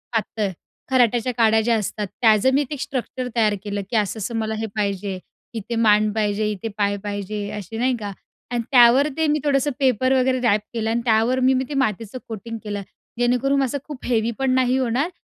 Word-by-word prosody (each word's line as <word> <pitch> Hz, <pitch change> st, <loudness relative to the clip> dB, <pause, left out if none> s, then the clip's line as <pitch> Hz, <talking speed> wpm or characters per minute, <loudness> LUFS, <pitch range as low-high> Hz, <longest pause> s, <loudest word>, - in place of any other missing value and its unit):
पातळ, 215 Hz, -2 st, -1 dB, 0.4 s
खराट्याच्या 245 Hz, -1 st, +2 dB
काड्या 220 Hz, -1 st, +4 dB
ज्या 230 Hz, +1 st, +2 dB
असतात, 210 Hz, 0 st, -3 dB
त्याचं 225 Hz, +3 st, +4 dB
मी 285 Hz, -, +3 dB
ते 295 Hz, -, -4 dB
स्ट्रक्चर 255 Hz, -2 st, -4 dB
तयार 215 Hz, -3 st, +3 dB
केलं 205 Hz, -1 st, -3 dB
की 235 Hz, -, -3 dB
असं-असं 215 Hz, +2 st, -2 dB
मला 220 Hz, 0 st, -2 dB
हे 225 Hz, -, -2 dB
पाहिजे. 200 Hz, -2 st, -2 dB, 0.3 s
इथे 230 Hz, +1 st, -4 dB
मान 215 Hz, -2 st, +4 dB
पाहिजे, 210 Hz, 0 st, 0 dB
इथे 210 Hz, +2 st, -5 dB
पाय 200 Hz, -1 st, +1 dB
पाहिजे, 205 Hz, 0 st, -4 dB
असे 210 Hz, +3 st, -7 dB
नाही 250 Hz, +1 st, +1 dB
का? 205 Hz, -1 st, -5 dB, 0.4 s
आणि 240 Hz, -1 st, 0 dB
त्यावर 250 Hz, +3 st, +6 dB
ते 320 Hz, -1 st, +2 dB
मी 300 Hz, +1 st, +2 dB
थोडंसं 285 Hz, 0 st, +1 dB
पेपर 260 Hz, -1 st, +2 dB
वगैरे 255 Hz, 0 st, +2 dB
रॅप 215 Hz, -4 st, +3 dB
केलं 225 Hz, -1 st, -1 dB
आणि 235 Hz, +1 st, 0 dB
त्यावर 230 Hz, +3 st, +3 dB
मी, 260 Hz, +1 st, +4 dB
मी 260 Hz, -, +1 dB
ते 295 Hz, -, -4 dB
मातीचं 225 Hz, -3 st, -1 dB
कोटिंग 230 Hz, +1 st, -6 dB
केलं 205 Hz, -2 st, -4 dB, 0.4 s
जेणेकरून 250 Hz, +3 st, +2 dB
असं 270 Hz, +2 st, -1 dB
खूप 290 Hz, -4 st, -8 dB
हेवी 235 Hz, -1 st, +1 dB
पण 265 Hz, -1 st, +1 dB
नाही 255 Hz, 0 st, +2 dB
होणार 260 Hz, +6 st, 0 dB
230 Hz, 195 wpm, -22 LUFS, 210-255 Hz, 0.4 s, त्यावर